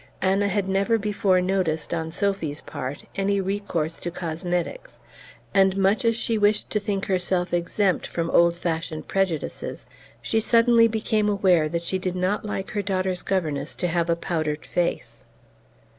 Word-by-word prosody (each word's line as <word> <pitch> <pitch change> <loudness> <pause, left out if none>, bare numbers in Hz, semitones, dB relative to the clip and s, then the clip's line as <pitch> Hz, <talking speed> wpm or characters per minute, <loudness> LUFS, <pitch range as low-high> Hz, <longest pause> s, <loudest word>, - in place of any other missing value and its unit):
Anna 195 +2 +2
had 200 0 0
never 195 +4 +2
before 200 -3 +2
noticed, 180 -5 0
on 160 -1 -2
Sophy's 170 -4 -2
part, 145 -1 -6
any 200 0 +1
recourse 190 -5 -2
to 175 - -4
cosmetics, 175 - -3 0.6
and, 195 -1 +4
much 195 +6 +2
as 230 0 +3
she 230 -2 0
wished 205 +1 +2
to 210 - +1
think 200 -2 -2
herself 180 -1 0
exempt 180 +2 +1
from 165 -1 -2
old 170 0 +5
fashioned 165 -2 -3
prejudices, 190 -6 -2 0.3
she 120 - 0
suddenly 230 +1 +5
became 220 -1 0
aware 185 -6 +3
that 170 +1 -2
she 185 +2 -1
did 185 -1 -2
not 185 +3 0
like 195 -2 -4
her 205 - -1
daughter's 185 -2 -1
governess 155 -6 -2
to 180 - -1
have 170 0 0
a 170 - +3
powdered 155 -3 -2
face. 175 -1 -2
185 Hz, 160 wpm, -24 LUFS, 170-200 Hz, 0.6 s, old